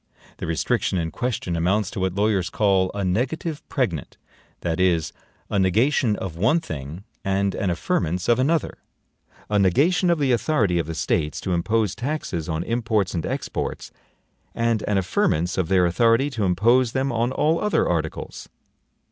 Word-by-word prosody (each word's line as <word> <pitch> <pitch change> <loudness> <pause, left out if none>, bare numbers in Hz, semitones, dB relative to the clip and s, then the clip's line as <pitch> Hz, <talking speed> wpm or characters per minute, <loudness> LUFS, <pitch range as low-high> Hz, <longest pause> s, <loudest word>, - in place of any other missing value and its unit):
The - - -5
restriction 80 +3 0
in 80 -2 -2
question 120 -8 -2
amounts 95 +4 +1
to - - -5
what 95 -1 -1
lawyers 100 -3 +1
call 95 -3 +2
a 100 -1 -1
NEGATIVE 140 - -1
PREGNANT 95 - -2 0.4
that 85 -1 -2
is, 85 -4 +1 0.3
a 100 - 0
NEGATION 110 +5 +2
of 95 -5 -5
one 110 - +3
thing, 80 - -7 0.2
and 95 0 0
an 100 - -1
AFFIRMANCE 85 +1 -1
of 120 +1 +3
another; 155 +4 0 0.7
a 105 -1 +1
negation 150 - +3
of 170 - +3
the 140 -3 +1
authority 115 - +1
of 80 - -2
the 80 - -4
States 75 0 -1
to 95 - -2
impose 105 +3 +1
taxes 120 - -3
on 80 +1 -1
imports 110 -4 0
and 85 -3 -2
exports, - - -4 0.6
and 115 -2 +1
an 105 - +1
affirmance 85 -2 +1
of 95 -3 0
their 90 0 +3
authority 115 +9 +3
to 110 -6 -1
impose 115 +7 +3
them 135 +1 0
on 120 +1 0
all 155 +5 +1
other 210 0 +1
articles. 80 -2 -3
100 Hz, 165 wpm, -23 LUFS, 85-120 Hz, 0.7 s, one